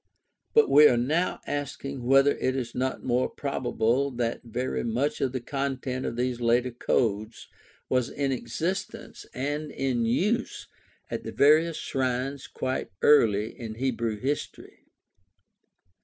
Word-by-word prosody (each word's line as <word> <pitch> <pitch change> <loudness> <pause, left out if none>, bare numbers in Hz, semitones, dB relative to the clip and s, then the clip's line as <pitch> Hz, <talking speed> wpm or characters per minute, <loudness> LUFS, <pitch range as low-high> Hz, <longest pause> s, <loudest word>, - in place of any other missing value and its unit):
But 450 -2 +6
we 150 0 +8
are 120 - +3
now 155 +9 0
asking 140 -1 -4
whether 135 +3 +5
it 130 - 0
is 120 -3 -3
not 130 +1 -2
more 125 0 +1
probable 130 -1 0
that 120 -2 -2
very 125 +2 -3
much 120 +6 -1
of 135 - +1
the 130 - -3
content 130 0 -3
of - - -4
these 125 0 -2
later 120 +2 +2
codes 110 -2 -1 0.4
was 125 -2 +1
in 140 -1 -1
existence 155 +10 -4
and 145 +3 -3
in 130 -4 -1
use 210 - 0 0.4
at - - -3
the - - -5
various 155 +3 +4
shrines 130 +1 -2
quite 130 0 -3
early 110 -7 +4
in 110 -2 -7
Hebrew 115 -3 -1
history. 140 +5 -5
130 Hz, 135 wpm, -27 LUFS, 120-140 Hz, 0.4 s, we